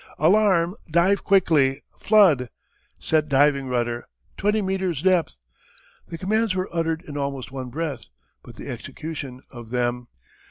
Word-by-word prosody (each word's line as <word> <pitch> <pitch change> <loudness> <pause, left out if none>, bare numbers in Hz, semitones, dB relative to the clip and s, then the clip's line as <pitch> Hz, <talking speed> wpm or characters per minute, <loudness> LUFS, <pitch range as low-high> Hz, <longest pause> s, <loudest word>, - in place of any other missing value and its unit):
"Alarm! 180 0 +3 0.2
Dive 175 +5 +2
quickly! 155 -9 +3 0.2
Flood!" 180 - +4 0.5
"Set 155 -1 0
diving 140 0 +3
rudder!" 120 -1 -2 0.3
"Twenty 210 +2 +1
meters' 190 -6 -2
depth!" 180 - +2 0.7
The 165 - -7
commands 215 +2 0
were 185 -2 -3
uttered 165 0 -1
in 145 -1 -6
almost 140 -2 -4
one 130 -2 -6
breath. 155 +3 -4 0.4
But - - -14
the - - -9
execution 140 -5 -7
of 120 -3 -10
them! 120 0 -1
160 Hz, 130 wpm, -23 LUFS, 135-185 Hz, 0.7 s, Flood